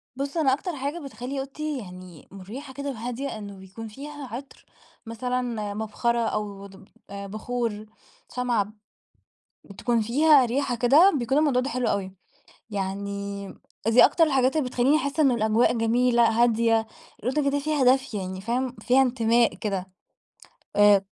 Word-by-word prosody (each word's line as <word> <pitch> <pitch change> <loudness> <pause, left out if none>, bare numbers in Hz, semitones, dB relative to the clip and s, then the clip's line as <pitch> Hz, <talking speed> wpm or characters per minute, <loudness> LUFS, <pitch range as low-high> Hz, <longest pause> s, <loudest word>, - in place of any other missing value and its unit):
بص 280 +4 -4
أنا 270 -5 +3
أكتر 345 +4 -3
حاجة 285 +5 -3
بتخلّي 270 -1 -6
أوضتي 290 +2 -4
يعني 180 - -11
مُريحة 235 +9 -9
كده 280 +1 -5
وهادية 245 +1 -4
إنه 200 -2 -8
بيكون 190 +4 -9
فيها 285 +5 -8
عطر 275 +2 -10 0.4
مثلًا 250 +3 -2 0.3
مبخرة 220 +3 -1
أو 210 -3 -3
دوب 195 0 -16 0.2
بخور، 215 +2 -4 0.5
شمعة 245 -4 +1
ب 205 +2 -15 0.9
بتكون 230 +3 -1
فيها 280 +4 +5
ريحة 250 +1 -1
كده 280 - +6
بيكون 260 +3 0
الموضوع 290 -5 +3
ده 270 - -3
حلو 250 -1 -1
أوي 190 -3 -1 0.6
يعني 200 0 -4 0.4
دي 225 +2 +7
أكتر 335 - +3
الحاجات 270 -3 +2
اللي 260 -5 0
بتخلّيني 260 +5 +3
أحسّ 285 +1 -3
إن 275 -4 +5
الأجواء 220 0 +2
جميلة 235 0 +3
هادية 225 -1 +2 0.3
الأوضة 280 +4 0
كده 285 +1 0
فيها 295 -1 0
دفء 255 -2 +3
يعني 185 -1 -5
فاهم؟ 245 +4 -2
فيها 255 +2 +4
إنتماء 235 -2 +2
كده 195 -3 -3 0.9
آآ 205 -1 +6
240 Hz, 145 wpm, -25 LUFS, 210-270 Hz, 0.9 s, دي